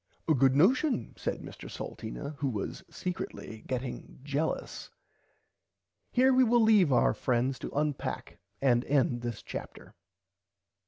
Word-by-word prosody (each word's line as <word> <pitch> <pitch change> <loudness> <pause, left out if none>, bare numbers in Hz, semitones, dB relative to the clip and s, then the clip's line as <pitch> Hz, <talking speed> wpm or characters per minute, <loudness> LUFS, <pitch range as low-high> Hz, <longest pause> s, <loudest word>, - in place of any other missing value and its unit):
A 160 - +5
good 135 -1 +4
notion 245 - +3
said - - -3
Mr - - -9
Salteena 100 - -6
who 140 - 0
was 105 -5 -4
secretly 170 -10 -5
getting 130 -1 -4
jellus. 145 +3 -2 1.2
Here 260 +1 +5
we 260 0 +6
will 240 -1 +4
leave 210 -8 +5
our 125 - +4
friends 125 +1 0
to - - -5
unpack 145 -1 -3 0.2
and 120 -3 +4
end 130 -4 +2
this 120 -2 -5
Chapter. - - -8
140 Hz, 125 wpm, -30 LUFS, 125-190 Hz, 1.2 s, we